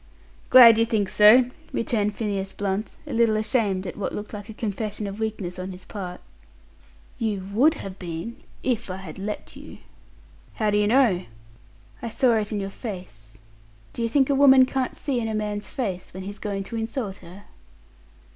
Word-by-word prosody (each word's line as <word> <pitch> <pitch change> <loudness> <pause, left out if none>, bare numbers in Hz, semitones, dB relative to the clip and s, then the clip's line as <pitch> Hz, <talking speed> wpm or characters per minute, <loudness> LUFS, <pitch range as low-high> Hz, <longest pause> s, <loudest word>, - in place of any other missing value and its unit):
"Glad 230 -3 +9
you 230 - +4
think 210 -4 0
so!" 240 +6 +6 0.2
returned 210 -3 0
Phineas 200 -3 -3
Blunt, 200 +1 -3
a - - -6
little 230 -2 +3
ashamed 215 -3 0
at 180 - -5
what 205 - -3
looked 210 +2 -6
like 205 0 -7
a - - -7
confession 210 -1 -3
of 200 +1 -6
weakness 205 -5 -3
on 185 +1 -4
his 180 0 -10
part. 180 -4 -7 1.0
"You 205 -4 -2
would 295 +9 +4
have 195 -7 -8
been 175 +6 -6 0.3
if 235 -4 -1
I 185 - -3
had 190 -2 -9
let 210 +2 -5
you." - - -11 0.8
"How 215 -3 +1
do 205 - +2
you 205 - +2
know?" 225 -6 +3 0.8
"I 235 - -4
saw 245 +1 +3
it 210 0 -2
in 210 - -1
your 195 0 -4
face. 145 - -8 0.6
Do - - -4
you 230 - 0
think 270 +2 +3
a - - +4
woman 270 -1 +7
can't 260 0 -2
see 270 -5 -2
in 225 - -2
a 220 - -2
man's 210 -1 -3
face 190 -9 -4
when 190 - -6
he's 200 +2 -7
going 200 -2 -3
to 230 +4 -6
insult 225 -3 -3
her?" 185 +3 -13
210 Hz, 185 wpm, -24 LUFS, 195-230 Hz, 1.0 s, Glad